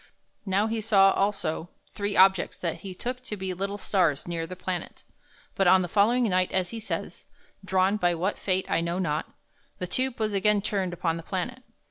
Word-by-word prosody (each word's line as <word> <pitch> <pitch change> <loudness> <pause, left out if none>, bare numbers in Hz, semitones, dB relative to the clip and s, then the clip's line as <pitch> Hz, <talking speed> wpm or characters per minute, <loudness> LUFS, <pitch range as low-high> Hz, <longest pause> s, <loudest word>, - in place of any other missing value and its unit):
Now 195 +2 +2
he 225 0 -2
saw 195 -3 +5
also 195 -5 -1 0.2
three 205 0 -2
objects 190 -1 +4
that 170 -3 -3
he 190 -2 -8
took 250 +5 -4
to 220 -5 -6
be 190 -1 -3
little 195 +3 -3
stars 175 -8 +1
near 165 -1 -3
the 185 - -7
planet. 185 -1 -5 0.5
But 195 - +2
on 185 +1 +6
the - - -3
following 220 +7 +3
night, 185 -4 +2
as 185 -1 0
he 230 - -5
says, 220 - -5 0.4
"drawn 190 +2 +2
by 175 -3 +2
what 185 +5 -2
fate 185 -1 0
I - - +1
know 170 +1 -2
not," 160 -4 -2 0.5
the 180 - -3
tube 255 +6 -1
was 215 -1 0
again 205 +1 +2
turned 195 -4 -1
upon 165 -1 -1
the - - -6
planet. 195 +9 -4
190 Hz, 195 wpm, -27 LUFS, 180-210 Hz, 0.5 s, on